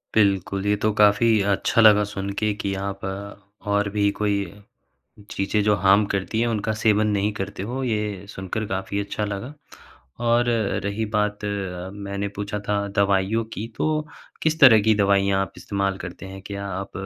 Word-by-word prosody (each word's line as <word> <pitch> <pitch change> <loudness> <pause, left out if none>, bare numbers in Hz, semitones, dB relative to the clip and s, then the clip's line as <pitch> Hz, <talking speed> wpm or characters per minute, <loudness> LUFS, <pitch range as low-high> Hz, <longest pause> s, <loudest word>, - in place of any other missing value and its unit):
बिल्कुल। 100 -2 +2
ये 105 0 +3
तो 110 +1 0
काफ़ी 105 +2 +4 0.2
अच्छा 115 +4 +2
लगा 105 -1 +7
सुन 100 -1 -5
के 105 -1 +1
कि 100 -1 -2
आप 100 0 -5 0.7
और 105 0 +1
भी 100 0 +1
कोई 105 -1 +1 1.0
चीज़ें 100 +1 0
जो 105 0 +4
हार्म 100 +2 +4
करती 100 +3 -1
है 120 - +2
उनका 110 -1 -1
सेवन 105 -1 +3
नहीं 105 +1 0
करते 95 0 -4
हो 135 +1 -3
ये 105 -4 -2
सुनकर 95 +4 -4
काफ़ी 95 +1 -3
अच्छा 100 +1 -3
लगा। 105 +6 -5 0.8
और 120 +1 +3 0.3
रही 100 +2 -2
बात 105 0 0 0.5
मैंने 100 0 -4
पूछा 105 +1 -3
था 100 -1 0
दवाइयों 100 +3 +2
की 110 +3 -5
तो - - 0 0.6
किस 160 0 0
तरह 120 -7 +9
की 110 - +5
दवाइयाँ 100 -1 +2
आप 95 - -4
इस्तेमाल 100 -1 -2
करते 90 +1 -8
हैं 95 0 -9
क्या 100 0 -5
आप 95 +1 -5
100 Hz, 165 wpm, -23 LUFS, 100-105 Hz, 1.0 s, तरह